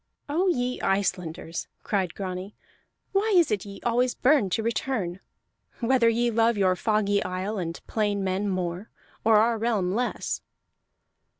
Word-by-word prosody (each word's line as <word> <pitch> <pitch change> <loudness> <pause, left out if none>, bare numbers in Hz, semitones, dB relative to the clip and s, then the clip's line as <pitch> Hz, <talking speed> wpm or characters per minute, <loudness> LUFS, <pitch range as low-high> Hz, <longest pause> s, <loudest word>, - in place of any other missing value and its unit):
"Oh 335 +7 +1
ye 250 -7 0
Icelanders!" 180 -4 -1 0.2
cried 190 -5 -1
Grani. 185 +1 -5 0.6
"Why 405 +3 +1
is 340 -8 +4
it 205 -2 -1
ye 200 -1 -9
always 245 +1 +1
burn 265 -7 +3
to 220 +5 0
return 225 -6 -2 0.6
whether 240 -1 +4
ye 235 +1 +1
love 230 0 +3
your 185 -2 +3
foggy 205 0 +1
isle 185 +3 -3
and 165 -1 -4
plain 205 -2 0
men 190 +2 0
more, 185 +1 -3 0.3
or 220 -1 +5
our 225 +1 +3
realm 210 -6 +1
less?" 245 +3 -2
210 Hz, 140 wpm, -26 LUFS, 185-235 Hz, 0.6 s, or